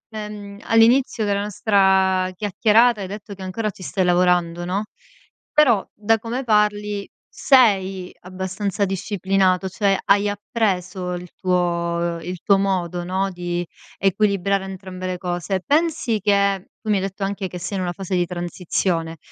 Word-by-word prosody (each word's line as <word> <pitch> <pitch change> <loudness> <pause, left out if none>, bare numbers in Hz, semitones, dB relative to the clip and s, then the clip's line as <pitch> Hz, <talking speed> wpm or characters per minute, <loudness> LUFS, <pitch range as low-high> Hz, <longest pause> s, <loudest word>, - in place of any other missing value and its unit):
Ehm, 210 -1 -7
all'inizio 225 0 +4
della 200 -1 0
nostra 190 -2 +2
chiacchierata 215 +3 +3
hai 190 - -4
detto 205 +1 -8
che 195 - -12
ancora 210 +3 -3
ci 190 - -16
stai 185 0 -1
lavorando, 175 -1 +2
no. 185 +4 -1 0.7
Però, 245 -10 +4
da 220 +2 +1
come 235 +4 -4
parli 210 -2 +1 0.3
sei 195 -8 +3
abbastanza 190 +2 -3
disciplinato, 190 -1 0
cioè 195 +1 +1
hai 200 +1 +3
appreso 190 -3 -2
il 180 0 -7
tuo 170 -2 0
il 180 +2 -6
tuo 200 -1 +4
modo, 180 -3 -1
no, 190 +2 -1
di 175 -1 -3 0.3
equilibrare 195 0 +1
entrambe 185 -1 -7
le 185 0 -3
cose. 180 +1 -2
Pensi 300 -7 +1
che 200 -1 +1
tu 220 - -6
mi 210 - +3
hai - - -1
detto 195 +1 -4
anche 195 0 -2
che 180 - -8
sei 180 +3 -4
in 185 - -1
una 175 - -1
fase 190 0 -4
di 175 -1 +2
transizione, 175 -1 -2
195 Hz, 150 wpm, -22 LUFS, 180-205 Hz, 0.7 s, all'inizio